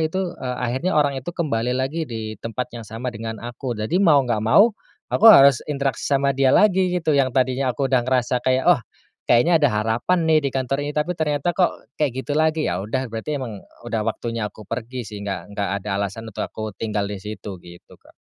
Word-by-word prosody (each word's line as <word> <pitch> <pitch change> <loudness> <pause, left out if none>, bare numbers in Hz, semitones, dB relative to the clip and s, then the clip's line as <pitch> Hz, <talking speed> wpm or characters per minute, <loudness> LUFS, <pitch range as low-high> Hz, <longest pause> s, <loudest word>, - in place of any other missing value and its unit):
itu, 175 +3 -1
eee, 125 -1 -3
akhirnya 130 +9 -1
orangnya 140 -2 +2
itu 170 +7 -6
kembali 125 -6 -1
lagi 145 +5 -2
di 110 -3 -6
tempat 120 +2 -5
yang 115 -3 -9
sama 120 +3 -5
dengan 115 0 -6
aku. 120 0 -5
Jadi 110 - 0
mau 150 -8 +5
gak 120 -3 0
mau, 205 - +5 0.4
aku - - +1
harus 140 - +7
interaksi 140 -4 -2
sama 140 0 +2
dia 135 -1 +4
lagi, 190 -3 +4
gitu. 160 -3 0
Yang 135 -2 +3
tadinya 130 0 +1
aku 135 +3 -1
udah 130 -1 +3
ngerasa 125 -1 0
kayak, 130 0 +1
"Oh, 175 -8 +5 0.5
kayaknya 160 +8 +4
ada 145 - +6
harapan 115 +11 0
nih, 160 -1 +4
di - - -8
kantor 135 +1 -1
ini." 145 - -3
Tapi 150 +4 0
ternyata 160 +1 0
kok 180 - +3 0.3
kayak 130 -3 -1
gitu 145 - -3
lagi. 155 0 +1
Ya 90 +1 -1
udah, 130 +6 -2
berarti 115 +7 -3
emang 115 -6 -6 0.2
udah 115 -2 -2
waktunya 115 -1 -3
aku 105 +1 -14
pergi 120 +3 -5
sih. 105 +1 -8
Enggak 100 -1 -5
enggak 100 -1 -1
ada 105 - -8
alasan 100 +3 -4
untuk 110 - -5
aku 110 -1 -6
tinggal 105 -1 -2
di 100 -2 -6
situ, 105 -1 -7
gitu, 85 0 -14
Kak. - - -21
130 Hz, 210 wpm, -22 LUFS, 110-150 Hz, 0.5 s, harus